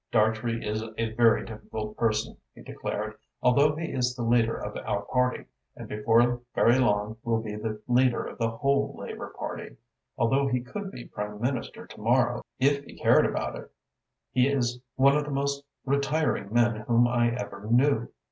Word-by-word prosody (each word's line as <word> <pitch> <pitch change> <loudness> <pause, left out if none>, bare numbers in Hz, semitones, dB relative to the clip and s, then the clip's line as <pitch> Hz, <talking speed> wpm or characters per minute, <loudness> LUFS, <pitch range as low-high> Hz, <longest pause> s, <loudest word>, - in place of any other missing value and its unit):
"Dartrey 110 +1 +1
is 105 +1 -1 0.2
a 115 -1 -1
very 115 0 +4
difficult 110 -1 -6
person," 115 -2 0 0.2
he - - -13
declared. - - -5 0.2
"Although 140 +4 +4
he 165 +1 -4
is 125 -1 0
the 120 - -4
leader 115 -1 +2
of - - -6
our 100 - -2
party, 125 +3 0 0.3
and - - -9
before 115 +3 +2
very 120 +3 +5
long 105 -2 +1
will 115 -1 +1
be 110 -2 -5
the 110 0 -5
leader 125 0 +3
of - - -8
the 115 -1 +1
whole 140 +5 0
Labour - - -7
Party, - - -6 0.4
although 135 +4 +2
he 125 -2 0
could 195 +11 -6
be 125 - -9
Prime 105 0 -6
Minister 125 +1 -3
to - - -13
morrow - - +2 0.2
if 140 +1 +2
he - - -13
cared - - +5
about - - -3
it; - - -10 0.6
he 125 +1 +3
is 125 -3 0 0.2
one 140 +1 +5
of 150 - +2
the 145 - -7
most 140 0 -1 0.2
retiring 140 -6 0
men 120 -1 +3
whom 115 +2 +3
I 120 -1 +2
ever 100 -3 -6
knew. 120 -1 +3
120 Hz, 175 wpm, -27 LUFS, 110-135 Hz, 0.6 s, very